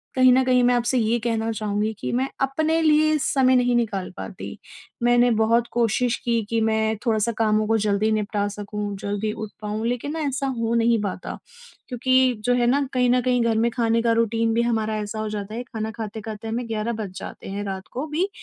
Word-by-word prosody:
कहीं 255 -1 +6
न 260 +1 +4
कहीं 250 -1 +3
मैं 245 0 +4
आपसे 240 +2 +1
ये 230 0 +2
कहना 225 -1 -1
चाहूँगी 210 0 -1
कि - - -3
मैं 260 +2 +1
अपने 315 +4 +1
लिए 310 0 +4
समय 260 -2 +3
नहीं 245 -1 +3
निकाल 210 -6 -1
पाती। - - -7 0.5
मैंने 240 0 +4
बहुत 230 +2 +2
कोशिश 240 +1 +1
की, 230 -2 +1
कि 230 -1 +1
मैं 220 0 +1
थोड़ा-सा 225 0 +1
कामों 215 -1 +2
को 225 0 +3
जल्दी 210 +1 +1
निपटा 210 -1 0
सकूँ, 205 0 -5
जल्दी 205 +2 -2
उठ 215 -1 -6
पाऊँ 215 +1 -3
लेकिन 245 +4 -2
ना 325 - -3
ऐसा 275 0 -2
हो 230 0 0
नहीं 230 -1 +3
पाता, 185 -2 -4 0.5
क्योंकि 255 0 +2
जो 245 - +3
है 240 -1 +2
ना 280 +3 +3
कहीं 250 -1 +2
न 250 0 +3
कहीं 250 -1 +1
घर 225 -1 +1
में 230 +1 +2
खाने 230 -1 +1
का 230 - +2
रूटीन 225 0 0
भी 230 - +2
हमारा 220 -2 0
ऐसा 210 +1 -5
हो 215 0 -2
जाता 210 0 -5
है, 240 - -4
खाना 220 -3 -5
खाते-खाते 220 0 -6
हमें 230 +2 -3
11 225 +1 -2
बज 200 - -5
जाते - - -8
हैं 200 +1 -4
रात 190 0 -5
को 265 +4 -3
भी 340 +7 -1
230 Hz, 210 wpm, -23 LUFS, 215-245 Hz, 0.5 s, कहीं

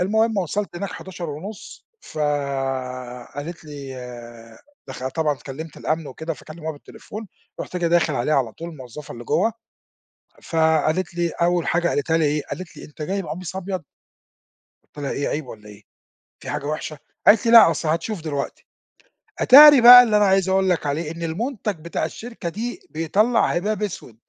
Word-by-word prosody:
المهم 220 +3 +1
وصلت 195 +1 -3
هناك 200 +2 -4
11:30 180 +2 -8
ف - - -11 1.2
قالت 160 +3 -7
لي 140 -3 -8 0.9
دخل 130 0 -5
طبعًا 150 0 0
اتكلّمت 145 +4 -9
الأمن 155 -1 -2
وكده 160 +4 -5
فكلّموها 155 +3 -7
بالتليفون، 205 +7 -10 0.3
رُحت 180 - -6
جاي 175 -1 0
داخل 170 -3 +2
عليها 130 +5 0
على 125 -5 +1
طول 170 +7 -8
الموظفة 140 0 -10
اللي 120 0 -10
جوّه 225 - +1 0.9
فقالت 160 +2 +1
لي، 175 -1 0
أول 175 0 0
حاجة 175 0 +1
قالتها 160 +1 0
لي 165 - +2
إيه، 150 0 0
قالت 185 -3 -7
لي: - - -10
"أنت 150 +1 -10
جاي 195 +5 -2
بقميص 180 +1 -6
أبيض؟" 185 -3 -4 1.1
قُلت 145 - -7
لها: - - -2
"إيه، 140 - -2
عيب 150 -3 -3
والّا 105 -3 -11
إيه، 105 0 -14 0.6
في - - -9
حاجة 145 -1 -3
وحشة؟" 155 0 -4 0.3
قالت 215 +1 +6
لي: 230 - +3
"لأ 230 -8 +9
أصل 155 0 -2
هتشوف 170 +3 -2
دلوقتي." 145 -3 -5 0.8
أتاري 290 0 +9
بقى 245 +1 +11
اللي 220 -3 +2
أنا 210 - +4
عايز 190 -1 +2
أقول 190 0 +2
لك 165 -4 0
عليه 150 +2 -2
إن 170 - -9
المنتج 205 - -3
بتاع 170 -1 -3
الشركة 220 +3 -6
دي 235 - -5
بيطلّع 210 +9 +2
هباب 210 +5 -1
أسود. 175 - -5
165 Hz, 165 wpm, -22 LUFS, 150-195 Hz, 1.2 s, بقى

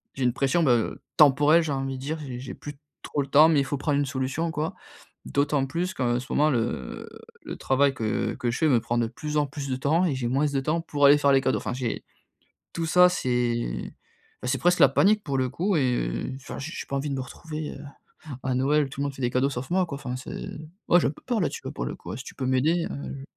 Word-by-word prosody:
j'ai 135 - -2
une 125 - +2
pression, 140 +6 +1
ben, 130 - +4
heu, 115 -2 0
temporelle, 150 +3 +6
j'ai 155 - -3
envie 135 -1 -3
de - - -9
dire. 155 +3 -2
J'ai 130 -4 -6
j'ai 130 - -7
plus 145 -1 -9 0.3
trop 145 - -2
le 140 - -4
temps, 150 +4 +6
mais 155 - +4
il 140 - +1
faut 145 - -2
prendre 145 0 0
une 145 - +1
solution, 135 +5 -2
quoi! 155 0 -2 0.5
D'autant 140 -1 +1
plus 175 +6 -2
qu'en 120 -2 0
ce 130 - -9
moment, 150 +1 +3
le, 125 - +2 0.5
heu, - - -13 0.2
le - - -6
travail 135 +1 +2
que 110 -3 -1
que 120 - -1
je 115 - -3
fais 160 - +3
me 125 - +4
prend 120 +2 -2
de 115 - +1
plus 150 +6 -4
en 145 -1 +2
plus 140 -1 -6
de 130 - 0
temps 160 +7 +2
et 155 - +1
j'ai 125 -2 -2
moins 140 +4 +1
de 140 - 0
temps 160 +4 0
pour 145 -3 +1
aller 145 +1 +8
faire 140 -1 +3
les 135 - +5
cadeaux. 130 - +1
Enfin, - - -4
j'ai 125 -2 -3 0.7
tout 165 -1 -2
ça, 180 +2 +6
c'est, 120 - -1 0.5
bah, 125 - -3
c'est 135 +1 +1
presque 175 0 +2
la - - +8
panique 210 +1 +3
pour 140 -3 -1
le 130 - +1
coup 185 +7 0
et, 130 -4 +2
heu, - - -4
enfin, 135 - -8
j'ai 155 +4 -6
j'ai - - -6
pas 140 - -3
envie 140 +2 -2
de 140 - -1
me - - -2
retrouver, 155 +3 -7
heu, - - -10 0.6
à 130 -1 0
Noël, 145 +3 +2
tout 140 - -6
le 145 - 0
monde 140 - -4
fait 135 - -9
des 120 - +1
cadeaux 130 +2 +2
sauf 125 0 -5
moi, 185 0 +3
quoi. 140 - -5
Enfin 125 -3 -5
c'est 130 - -7 0.4
ouais, 175 - +7
j'ai - - +2
un - - -1
peu - - -17
peur, 240 -4 0
là 165 - +2
dessus, - - -7
pour - - -4
le - - -4
coup. - - -8
Si 130 - -7
tu - - -10
peux 130 - -3
m'aider, 155 +7 +2
heu. 140 -1 -6
140 Hz, 270 wpm, -26 LUFS, 130-155 Hz, 0.7 s, aller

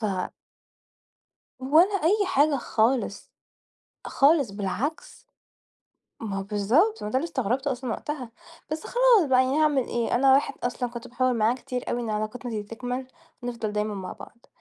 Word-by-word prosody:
ف 220 - -5 1.6
ولا 320 +10 +4
أي 405 +3 +3
حاجة 290 -3 +3
خالص، 230 -3 0 0.7
خالص، 280 -4 +3
بالعكس. 220 - -4 1.0
ما 205 -3 -4
هو - - -2
بالضبط، 225 - +1
ما - - -3
ده 260 - 0
اللي 305 - -3
استغربته 260 +2 -1
أصلًا 250 -1 -5
وقتها، 260 -1 -5 0.4
بس 310 0 -4
خلاص 480 - +4
بقى، 260 0 +4
يعني 270 +4 0
هاعمل 295 -4 +3
إيه؟ 235 -1 -2
أنا 265 +2 +5
واحد 275 - +3
أصلًا 245 0 -2
كنت 235 +1 -8
باحاول 250 0 0
معاه 225 +2 +2
كتير 250 -1 -5
أوي 240 - -1
إن 230 -2 -3
علاقتنا 215 +4 -3
دي 215 -2 -3
تكمل 245 +4 -5 0.4
ونفضل 235 -3 -4
دايمًا 210 0 -1
مع 190 -2 -6
بعض، 235 - -14
250 Hz, 155 wpm, -26 LUFS, 225-285 Hz, 1.6 s, أنا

